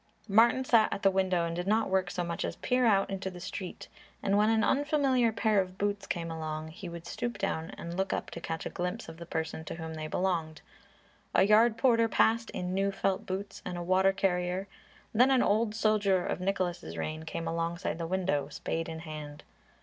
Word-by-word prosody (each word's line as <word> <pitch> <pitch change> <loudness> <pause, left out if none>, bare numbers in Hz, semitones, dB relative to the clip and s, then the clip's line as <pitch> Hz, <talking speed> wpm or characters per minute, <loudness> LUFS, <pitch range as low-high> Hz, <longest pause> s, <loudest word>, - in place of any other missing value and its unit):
Martin 235 +5 +4
sat 225 -4 +4
at 200 - -4
the 195 - +5
window 185 -2 +1
and 165 0 -3
did 175 +2 -3
not 220 +2 +2
work 190 -1 +1
so 175 - -2
much 170 -1 -3
as - - -3
peer 250 -1 +1
out 195 -3 +4
into 190 0 -3
the 180 -1 -10
street, 180 +1 -6 0.4
and 200 0 +2
when 210 +1 +4
an 225 0 +3
unfamiliar 275 -4 +2
pair 215 -2 +2
of 185 0 -7
boots 200 0 -1
came 170 -1 -3
along, 155 -1 -4
he 180 +3 -8
would 170 0 -8
stoop 240 +7 -4
down 165 -5 -2
and 170 +1 -6
look 190 +1 -1
up - - -3
to 170 - -7
catch 160 0 -4
a - - -2
glimpse 180 +6 -3
of 165 0 -9
the 170 0 -9
person 160 -1 -3
to 160 - -6
whom 160 -1 -6
they 155 -1 -5
belonged. 165 -3 -1 0.7
A - - +6
yard 220 +3 +5
porter 230 -2 +4
passed 230 +1 +2
in 180 0 -3
new 195 +1 +1
felt 195 -1 -1
boots 195 +2 -4
and 180 - -4
a 175 - -3
water 185 +2 +4
carrier; 185 0 0 0.5
then 250 +4 +5
an 265 -2 +4
old 215 +1 +2
soldier 205 -4 +2
of - - -2
Nicholas' 180 - -2
reign 155 - -3
came 165 +1 -5
alongside 165 -1 -2
the 165 - -2
window, 175 -6 0
spade 165 +3 -3
in 160 0 -6
hand. 150 -2 -8
185 Hz, 210 wpm, -30 LUFS, 165-210 Hz, 0.7 s, A